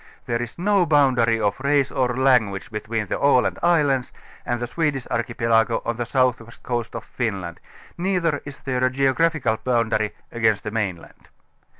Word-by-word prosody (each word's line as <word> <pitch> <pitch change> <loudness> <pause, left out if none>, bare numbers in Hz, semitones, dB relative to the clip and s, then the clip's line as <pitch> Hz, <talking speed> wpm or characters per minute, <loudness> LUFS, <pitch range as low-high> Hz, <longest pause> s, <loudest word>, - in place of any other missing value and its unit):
There 120 0 -1
is 120 -1 -6
no 195 0 +2
boundary 125 -7 +3
of 100 0 0
race 140 0 +1
or 125 -1 0
language 120 -8 +2
be 105 - -3
tween 110 0 -3
the - - -3
Aland 140 -3 +3
islands 145 -7 +2 0.4
and 120 0 -1
the 120 - -2
Swedish 145 -1 -1
archipelago 115 -1 +1
on 115 -1 -2
the 120 -1 -3
southwest 125 -3 -1
coast 120 -2 -3
of - - -5
Finland, 95 -8 -4 0.4
neither 175 -5 0
is 140 -1 -9
there 130 -1 -1
a 130 - +4
geographical 135 -2 +1
boundary 115 -3 0 0.2
against 110 -3 +1
the 105 - -4
mainland. 100 -6 -4
120 Hz, 165 wpm, -23 LUFS, 115-140 Hz, 0.4 s, a